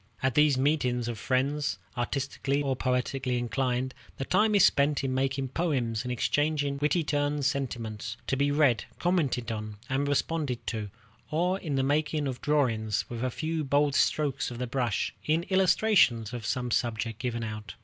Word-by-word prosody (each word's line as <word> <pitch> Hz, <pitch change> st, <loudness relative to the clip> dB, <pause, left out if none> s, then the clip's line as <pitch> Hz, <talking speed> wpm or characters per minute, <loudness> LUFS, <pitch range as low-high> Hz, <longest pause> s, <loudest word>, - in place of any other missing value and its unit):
At 135 Hz, -1 st, +2 dB
these 150 Hz, -1 st, +4 dB
meetings 130 Hz, -4 st, +1 dB
of 115 Hz, -2 st, -4 dB
friends, 140 Hz, +4 st, 0 dB, 0.2 s
artistically 140 Hz, +3 st, -1 dB
or 135 Hz, -2 st, 0 dB
poetically 125 Hz, 0 st, -1 dB
inclined, 125 Hz, +1 st, -1 dB, 0.2 s
the 135 Hz, -, -3 dB
time 215 Hz, +6 st, +3 dB
is 200 Hz, -, +7 dB
spent 145 Hz, 0 st, +2 dB
in 130 Hz, -1 st, -1 dB
making 135 Hz, 0 st, -1 dB
poems 130 Hz, -8 st, -1 dB
and 125 Hz, -, -4 dB
exchanging 145 Hz, +3 st, 0 dB
wittily 155 Hz, +3 st, +2 dB
turned 145 Hz, -1 st, 0 dB
sentiments, 115 Hz, -5 st, -3 dB
to -, -, 0 dB
be 140 Hz, +1 st, +2 dB
read, 145 Hz, -5 st, +3 dB
commented 145 Hz, -10 st, 0 dB
on, 110 Hz, -1 st, -5 dB
and 135 Hz, +2 st, 0 dB
responded 145 Hz, -3 st, -1 dB
to; 110 Hz, -3 st, -3 dB, 0.4 s
or 180 Hz, +5 st, +1 dB
in 155 Hz, -7 st, -3 dB
the 135 Hz, -, +2 dB
making 150 Hz, +2 st, +1 dB
of 130 Hz, -2 st, -4 dB
drawings, 115 Hz, -8 st, +1 dB
with 120 Hz, 0 st, -4 dB
a 130 Hz, -, +1 dB
few 160 Hz, +5 st, -2 dB
bold 145 Hz, +1 st, +2 dB
strokes 140 Hz, -2 st, +1 dB
of 120 Hz, -, -7 dB
the 125 Hz, -, -2 dB
brush, 120 Hz, -3 st, -1 dB
in 160 Hz, +2 st, +2 dB
illustration 190 Hz, -, +4 dB
of 115 Hz, -3 st, -5 dB
some 125 Hz, +2 st, -1 dB
subject 115 Hz, -2 st, -1 dB
given 120 Hz, -2 st, -2 dB
out. 105 Hz, -1 st, -6 dB
135 Hz, 170 wpm, -28 LUFS, 120-150 Hz, 0.4 s, is